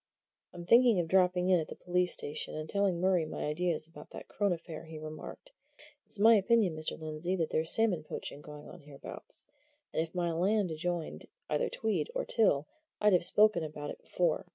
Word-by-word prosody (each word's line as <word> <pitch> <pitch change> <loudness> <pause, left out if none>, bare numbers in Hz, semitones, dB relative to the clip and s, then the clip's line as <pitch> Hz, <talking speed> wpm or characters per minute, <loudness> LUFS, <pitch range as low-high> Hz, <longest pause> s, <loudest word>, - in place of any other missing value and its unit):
"I'm 175 -1 -9
thinking 235 0 +5
of 170 - -1
dropping 180 0 +3
in 180 -2 +5
at 155 - -4
the - - -8
police 180 0 0
station 145 - -2
and 155 0 -5
telling 195 -1 0
Murray 185 -2 +2
my 155 - -5
ideas 155 +1 -1
about 155 -2 -13
that - - -10
Crone 205 -2 0
affair," 165 -2 -6
he 160 0 -9
remarked. 155 - -9 0.6
"It's - - -5
my 220 +3 +7
opinion, 205 -4 +2
Mr. 155 +1 -5
Lindsey, 155 +3 -3
that 165 -4 -2
there's 160 +1 0
salmon 210 -8 +2
poaching 150 -1 -7
going 150 0 -11
on - - -11
hereabouts, 140 -1 -10 0.5
and - - +1
if 165 +2 -6
my 175 -1 0
land 190 +3 +1
adjoined 170 +1 -4 0.2
either - - +1
Tweed 220 - -1
or - - -1
Till 155 -11 +2 0.3
I'd 210 -1 +4
have 175 - +4
spoken 210 -2 +4
about 150 -1 -6
it - - -10
before. 180 +1 -1
175 Hz, 195 wpm, -31 LUFS, 155-195 Hz, 0.6 s, my